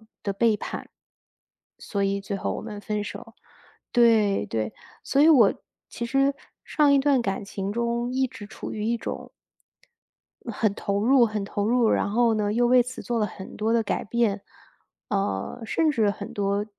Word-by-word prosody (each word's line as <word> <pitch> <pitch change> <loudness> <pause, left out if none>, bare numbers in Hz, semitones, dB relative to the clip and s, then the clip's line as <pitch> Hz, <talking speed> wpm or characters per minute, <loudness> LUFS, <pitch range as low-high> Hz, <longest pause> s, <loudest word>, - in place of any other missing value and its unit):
背 220 - -22 0.7
叛， - - -10 0.9
所 200 -2 -2
以 195 0 0
最 200 0 -4
后 - - -2
我 - - -4
们 210 -2 -7
分 210 0 -2
手。 205 - -9 0.6
对 220 - +4
对， 110 +1 -3 0.3
所 280 - +1
以 315 - +7
我 240 -10 +6 0.3
其 235 - -5
实 275 +2 +2 0.3
上 295 -2 +3
一 275 - +5
段 270 -2 +3
感 195 -1 -2
情 195 0 -4
中 235 +2 -1
一 265 0 +1
直 215 -4 -10
处 205 - -8
于 210 -1 -4
一 235 +1 +1
种 - - -6 1.2
很 210 -1 0
投 200 0 -1
入 255 0 +5
很 215 -2 -3
投 205 +1 -2
入， 240 -1 +3
然 - - +1
后 230 +1 +3
呢 210 -1 0
又 240 +2 +2
为 250 0 +6
此 255 +2 -8
做 240 -1 -2
了 210 - +1
很 190 -2 -10
多 220 +1 0
的 230 -1 +3
改 215 - -2
变。 215 -3 0 0.7
呃， 195 - -2
甚 320 +6 +2
至 225 -7 +2
很 205 0 -7
多， 200 0 0
220 Hz, 190 characters per minute, -25 LUFS, 200-240 Hz, 1.2 s, 以